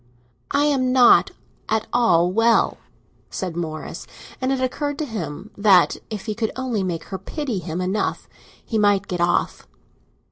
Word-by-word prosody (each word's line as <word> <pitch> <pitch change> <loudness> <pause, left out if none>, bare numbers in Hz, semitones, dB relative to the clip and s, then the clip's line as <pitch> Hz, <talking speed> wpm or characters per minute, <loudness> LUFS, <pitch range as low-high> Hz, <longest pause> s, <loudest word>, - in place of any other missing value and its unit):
"I 285 +1 +2
am 270 -4 +2
not 250 -2 +6 0.4
at 220 0 +1
all 180 -8 +3
well," 225 +3 +2 0.5
said 180 -3 -4
Morris; 155 -2 -5 0.3
and 260 +1 0
it 270 - 0
occurred 285 +3 -2
to 310 - -2
him 200 - -6
that, 200 -3 +4
if 210 -3 -6
he 215 - -2
could 220 0 -2
only 255 -5 -2
make 175 -3 -3
her 190 - -3
pity 275 -10 -4
him 165 0 -5
enough, 185 +3 -2 0.4
he 220 - -1
might 205 -1 +3
get 180 -1 -3
off. 175 - 0
215 Hz, 155 wpm, -22 LUFS, 180-255 Hz, 0.5 s, not